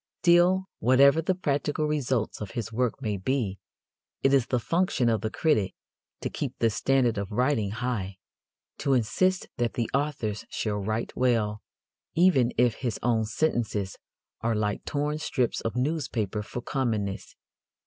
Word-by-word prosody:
Still, 180 Hz, +2 st, +5 dB
whatever 140 Hz, +6 st, +5 dB
the 180 Hz, +3 st, 0 dB
practical 150 Hz, -2 st, -1 dB
results 130 Hz, -9 st, -1 dB
of 105 Hz, -, -4 dB
his 115 Hz, -1 st, -3 dB
work 125 Hz, +3 st, -1 dB
may 105 Hz, -3 st, -1 dB
be, 100 Hz, -2 st, -1 dB, 0.6 s
it 135 Hz, -, +4 dB
is 135 Hz, -4 st, +4 dB
the 125 Hz, -, +1 dB
function 165 Hz, -2 st, +1 dB
of 110 Hz, -1 st, +1 dB
the 110 Hz, -, -1 dB
critic 110 Hz, -, +1 dB, 0.5 s
to -, -, -2 dB
keep 135 Hz, -2 st, -4 dB
the 115 Hz, -1 st, +2 dB
standard 125 Hz, -2 st, +2 dB
of 100 Hz, -1 st, -4 dB
writing 120 Hz, -2 st, +1 dB
high 105 Hz, -4 st, -3 dB, 0.6 s
to 140 Hz, -, +1 dB
insist 185 Hz, -, +1 dB
that 120 Hz, -1 st, -1 dB
the 115 Hz, -2 st, -2 dB
authors 130 Hz, -7 st, -1 dB
shall 105 Hz, -2 st, -2 dB
write 110 Hz, +3 st, -3 dB
well, 110 Hz, -4 st, +1 dB, 0.5 s
even 160 Hz, -9 st, +4 dB
if 120 Hz, -2 st, +3 dB
his 120 Hz, -5 st, -2 dB
own 115 Hz, -2 st, +2 dB
sentences 110 Hz, -5 st, -1 dB, 0.4 s
are 115 Hz, 0 st, 0 dB
like 105 Hz, -1 st, -1 dB
torn 150 Hz, +1 st, -1 dB
strips 130 Hz, -5 st, -1 dB
of 115 Hz, 0 st, -3 dB
newspaper 125 Hz, -, -1 dB
for 120 Hz, +4 st, -6 dB
commonness. 110 Hz, -7 st, -2 dB
120 Hz, 150 wpm, -27 LUFS, 110-140 Hz, 0.6 s, Still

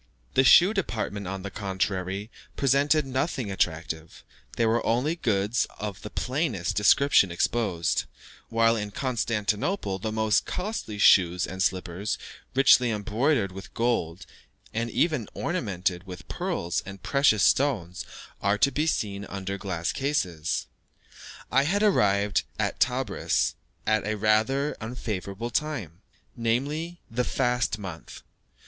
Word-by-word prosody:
The 130 Hz, -, +4 dB
shoe 180 Hz, +9 st, +7 dB
department, 110 Hz, -, -3 dB
on 95 Hz, 0 st, -5 dB
the 100 Hz, -, -5 dB
contrary, 95 Hz, +1 st, -2 dB, 0.2 s
presented 140 Hz, +2 st, +3 dB
nothing 130 Hz, -, -2 dB
attractive; 80 Hz, -3 st, -2 dB, 0.3 s
there 115 Hz, -, +3 dB
were 115 Hz, +1 st, +2 dB
only 130 Hz, +8 st, +1 dB
goods 110 Hz, -, 0 dB
of 105 Hz, -1 st, -5 dB
the 105 Hz, -, -7 dB
plainest 125 Hz, -, -1 dB
description 105 Hz, -1 st, +5 dB
exposed; 90 Hz, -2 st, 0 dB, 0.4 s
while 115 Hz, 0 st, +3 dB
in 105 Hz, -2 st, -3 dB
Constantinople 105 Hz, -, -1 dB
the 110 Hz, +3 st, -3 dB
most 110 Hz, -1 st, +1 dB
costly 180 Hz, -, -4 dB
shoes 90 Hz, -3 st, +5 dB
and 95 Hz, 0 st, -6 dB
slippers, 95 Hz, +2 st, -1 dB, 0.4 s
richly 130 Hz, -2 st, +6 dB
embroidered 110 Hz, +1 st, 0 dB
with 95 Hz, +1 st, -10 dB
gold, 115 Hz, -8 st, -1 dB, 0.5 s
and 115 Hz, +1 st, -1 dB
even 150 Hz, -, +1 dB
ornamented 95 Hz, -, -2 dB
with 90 Hz, -1 st, -9 dB
pearls 85 Hz, 0 st, -2 dB
and 100 Hz, 0 st, -10 dB
precious 140 Hz, -7 st, +3 dB
stones, 100 Hz, -11 st, +2 dB, 0.4 s
are 100 Hz, +1 st, +2 dB
to 140 Hz, -, +3 dB
be 150 Hz, +3 st, 0 dB
seen 100 Hz, -9 st, -1 dB
under 100 Hz, 0 st, -4 dB
glass 95 Hz, -3 st, -2 dB
cases. 90 Hz, -, -1 dB, 0.9 s
I 135 Hz, -, +5 dB
had 200 Hz, +6 st, +1 dB
arrived 105 Hz, -, +3 dB, 0.2 s
at -, -, -1 dB
Tebris -, -, +1 dB, 0.3 s
at 110 Hz, -1 st, +2 dB
a 110 Hz, 0 st, -1 dB
rather 110 Hz, +7 st, +2 dB
unfavourable 110 Hz, -1 st, -4 dB
time 110 Hz, -, -3 dB, 0.3 s
namely, 145 Hz, +9 st, -1 dB
the 125 Hz, +2 st, 0 dB
fast 125 Hz, -2 st, 0 dB
month. 95 Hz, -6 st, -9 dB
110 Hz, 125 wpm, -26 LUFS, 95-130 Hz, 0.9 s, shoe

